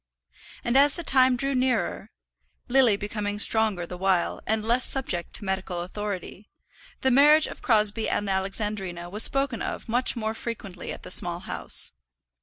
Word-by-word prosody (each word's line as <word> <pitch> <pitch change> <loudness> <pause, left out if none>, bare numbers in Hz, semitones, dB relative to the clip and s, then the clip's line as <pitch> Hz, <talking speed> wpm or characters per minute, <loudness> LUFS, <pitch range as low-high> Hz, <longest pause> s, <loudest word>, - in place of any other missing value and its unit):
And 235 - -1
as 285 +2 +5
the 345 - -5
time 260 -3 +4
drew 275 +2 0
nearer, 245 -6 -1 0.6
Lily 250 -4 +4
becoming 205 0 -4
stronger 210 -4 +2
the 180 +1 -9
while, 190 -2 0
and 220 0 0
less 240 +3 +2
subject 185 -11 -1
to 205 - -4
medical 190 -2 -3
authority, 200 +1 -6 0.5
the 265 - +2
marriage 295 +4 +6
of - - -8
Crosbie 215 -2 +2
and 205 - -1
Alexandrina 190 -2 -3
was 210 +2 -2
spoken 275 -1 +1
of - - -5
much 245 +3 +2
more 220 -2 -3
frequently 210 -6 -7
at - - -9
the - - -4
Small 175 -1 +2
House. - - +1
215 Hz, 160 wpm, -25 LUFS, 190-250 Hz, 0.6 s, marriage